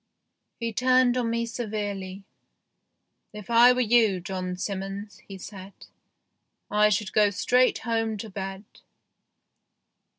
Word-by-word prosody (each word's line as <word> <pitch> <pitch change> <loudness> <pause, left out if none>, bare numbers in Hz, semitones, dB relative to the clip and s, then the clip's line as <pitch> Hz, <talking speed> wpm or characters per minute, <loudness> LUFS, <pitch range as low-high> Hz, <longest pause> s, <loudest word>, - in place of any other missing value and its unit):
He 230 -1 -3
turned 255 +1 +3
on 245 -2 0
me 235 0 -1
severely. 205 -4 -5 0.6
" - - -52 0.3
If 210 +1 -9
I 235 +2 +7
were 250 0 +1
you, 225 -5 +3
John 185 0 -5
Simmons," 195 +2 -5
he 195 - -9
said, 195 0 -10 0.5
" - - -52 0.3
I 210 0 +4
should 205 -1 -1
go 210 -1 +4
straight 250 +6 +2
home 225 -1 -2
to 220 +2 -7
bed." 195 0 -6
210 Hz, 130 wpm, -26 LUFS, 195-235 Hz, 0.6 s, I